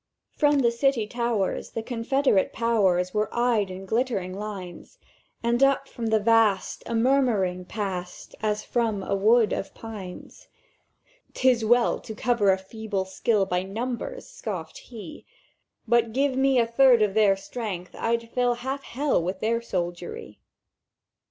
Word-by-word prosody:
"From 295 -1 +3
the 235 -2 +3
City 240 -1 +1
towers 235 -3 -1
the 225 - -3
Confederate 245 -2 +1
Powers 190 -6 +1
Were 210 0 0
eyed 235 -5 +1
in 185 +1 -8
glittering 220 -4 -1
lines, 195 -3 -8 0.5
And 235 +2 +1
up 275 0 +3
from 230 -1 -5
the 220 0 +3
vast 220 -2 +2
a 235 - -2
murmuring 225 -8 +2
passed 185 -4 -5
As 210 -1 -1
from 225 -5 -1
a - - -2
wood 220 +3 +4
of 195 - -4
pines. 220 - -9 0.9
"''Tis 255 -3 +3
well 240 +2 +3
to 220 - -9
cover 230 -4 +2
a 190 - +2
feeble 200 0 -4
skill 195 +2 +1
By 180 -1 0
numbers!' 245 - -5
scoffèd - - -6
He; 300 - -10 0.6
'But 230 -1 +2
give 270 +1 +1
me 265 0 +3
a 235 - +4
third 240 -1 +5
of 205 -2 0
their 210 -2 +4
strength, 195 -4 -6
I'd 230 0 -1
fill 245 -1 +1
Half 265 +3 -4
Hell 275 -4 0
with 185 +3 -3
their 230 +2 0
soldiery! 175 - -5
225 Hz, 145 wpm, -25 LUFS, 195-245 Hz, 0.9 s, third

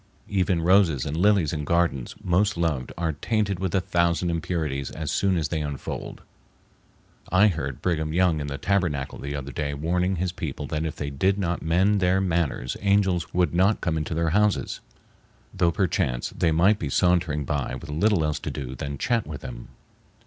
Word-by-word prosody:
Even 90 -4 +1
roses 90 -7 +4
and 75 - -3
lilies 95 -3 +3
in 75 -2 -2
gardens 85 -6 0
most 95 +2 +2
loved 80 -7 -1
are 85 -1 -1
tainted 100 +3 -1
with 95 0 -1
a - - +4
thousand 85 -1 +1
impurities 80 -5 -2
as 80 -2 -4
soon 95 -2 +1
as 80 -2 -1
they 80 -1 -1
unfold. 75 -2 -5 1.1
I 100 +4 +6
heard 70 -7 -4
Brigham 80 -3 0
Young 85 -1 +2
in 70 - -4
the 70 0 -4
Tabernacle 85 -9 -1
the 70 +1 -4
other 70 0 -5
day 70 +2 -3
warning 90 +5 0
his 90 +1 -1
people 80 -6 -5
that 75 +1 -2
if 80 - -5
they 70 -1 -4
did 95 +8 +1
not 90 -3 -1
mend 95 +5 +2
their 90 0 +3
manners 85 -9 -1
angels 100 -4 +2
would 90 -1 +1
not 95 +5 +3
come 85 -3 -1
into 80 +1 -2
their 80 0 +1
houses, 105 +2 +1 0.7
though 85 - +2
perchance 70 -9 0
they 85 - +1
might 95 +7 +4
be 75 - -3
sauntering 85 -2 +2
by 70 -2 -2
with 65 - -8
little 85 +2 +2
else 75 -1 -1
to - - -5
do 65 -2 -5
than 70 +2 -5
chat 115 - 0
with 80 -2 -7
them. - - -8
85 Hz, 185 wpm, -25 LUFS, 75-95 Hz, 1.1 s, I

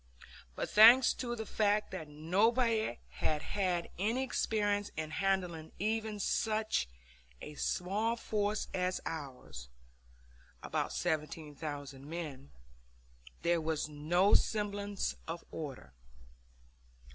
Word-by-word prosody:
But, - - -2
thanks 235 +4 +8
to 240 -2 -3
the 220 -1 -5
fact 210 0 +1
that 165 -5 -5
nobody 220 +9 +2
had 150 - -1
had 180 -4 -1
any 225 +7 +1
experience 205 -5 0
in 155 -1 -3
handling 180 -4 -1
even 215 +1 -1
such 215 - 0 0.5
a 150 - -8
small 200 +9 0
force 210 -2 -1
as 180 0 0
ours 125 - -7 0.9
about - - -1
17,000 150 -4 -3
men 150 -5 -6 0.9
there 170 -1 +3
was 155 -1 -1
no 165 +7 +2
semblance 205 -2 +1
of 165 +1 -5
order. 135 - -7
185 Hz, 100 wpm, -33 LUFS, 155-215 Hz, 0.9 s, thanks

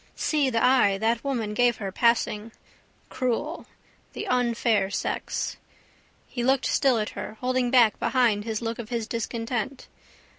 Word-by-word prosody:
See 295 -4 +1
the 230 -2 0
eye 250 -7 +4
that 225 +2 0
woman 235 -7 -2
gave 240 0 +3
her, 195 -2 -4
passing. 230 0 +1 0.6
Cruel. 260 +6 -2 0.5
The - - -5
unfair 235 -5 +1
sex. 205 - -3 0.7
He 245 - -4
looked 265 +1 +2
still 265 -4 +3
at 215 0 -1
her, 215 - -7
holding 255 -1 0
back 240 -4 +4
behind 235 -6 +2
his 220 0 -3
look 230 0 -3
his 235 -2 -2
discontent. 235 +3 -4
235 Hz, 140 wpm, -26 LUFS, 220-255 Hz, 0.7 s, eye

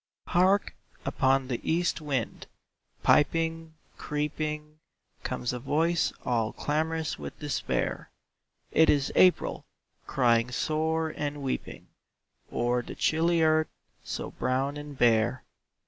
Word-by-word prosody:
Hark! 190 +3 +3 0.3
upon 135 0 +2
the 125 -3 -2
east 170 0 0
wind, 135 -7 -3 0.6
piping, 165 +1 +2 0.2
creeping, 150 +1 -3 0.4
Comes 125 - -3
a 125 - -4
voice 165 +6 +1
all 115 -3 0
clamorous 160 +1 -1
with - - -7
despair; 145 -3 -2 0.6
It 160 - +5
is 140 -2 +2
April, 185 -1 +3 0.4
crying 120 -2 +3
sore 160 +4 -1
and 145 -1 -3
weeping, 135 - -4 0.6
O'er 120 +1 +1
the - - -9
chilly 165 +1 +2
earth, 155 0 +3 0.3
so - - -5
brown 130 +3 -1
and 145 -1 -8
bare. 120 +2 +3
150 Hz, 110 wpm, -28 LUFS, 130-160 Hz, 0.6 s, It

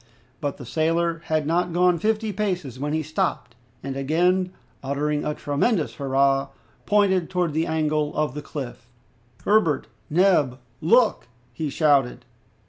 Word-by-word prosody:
But 145 -3 -3
the 125 - -9
sailor 165 +4 0
had 155 -1 0
not 175 +2 0
gone 180 -1 +3
fifty 215 +2 0
paces 180 - -3
when 145 +2 -2
he 155 +1 0
stopped, 155 -5 -2 0.3
and 135 0 -4
again 180 +7 +1 0.3
uttering 145 +2 -1
a 150 - -2
tremendous 150 +5 0
hurrah, 135 0 +1 0.4
pointed 190 -4 +3
towards 180 -4 0
the 160 +2 0
angle 155 -1 0
of 150 -3 0
the 150 - -5
cliff, 130 -5 -7 0.6
"Herbert! 205 -8 +3 0.2
Neb! 155 -7 +3 0.2
Look!" 220 - +3 0.3
he 150 +4 -3
shouted. 140 -4 +2
155 Hz, 135 wpm, -24 LUFS, 145-180 Hz, 0.6 s, gone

